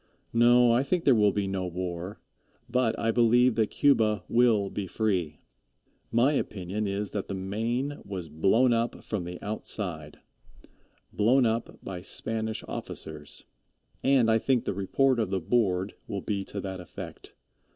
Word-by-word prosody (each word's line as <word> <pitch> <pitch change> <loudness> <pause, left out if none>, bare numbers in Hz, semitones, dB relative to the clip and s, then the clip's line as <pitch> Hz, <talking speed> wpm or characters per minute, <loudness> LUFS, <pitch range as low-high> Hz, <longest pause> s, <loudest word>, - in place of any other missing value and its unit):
No, 120 +1 +6
I 120 +2 +4
think 170 +5 0
there 135 - +7
will 105 -3 +4
be 100 0 -1
no 95 -1 -2
war, 90 +2 -5 0.5
but 125 -2 +1
I 115 - +1
believe 120 +1 +4
that 110 -1 +1
Cuba 110 -8 +3
will 115 -5 +3
be 100 -2 -4
free. 90 -8 -1 0.7
My 125 +6 +3
opinion 105 -4 -2
is 100 +1 -3
that 100 - -3
the 100 - -4
Maine 115 +9 -2
was 95 -4 -5
blown 95 - +3
up 115 +1 -1
from 100 -5 -3
the 90 0 -7
outside 90 -7 -4 1.0
blown 120 +5 +4
up 115 +1 -1
by 90 -2 -6
Spanish 110 +3 -2
officers, 75 -2 -6 0.6
and 130 -4 +4
I 110 - +4
think 130 0 +1
the - - -1
report 120 +7 +1
of 110 -4 0
the 95 0 0
Board 95 -1 +1
will 100 - -4
be 100 -2 -2
to 100 - -6
that 95 -1 -5
effect. 90 - -10
105 Hz, 155 wpm, -28 LUFS, 95-120 Hz, 1.0 s, there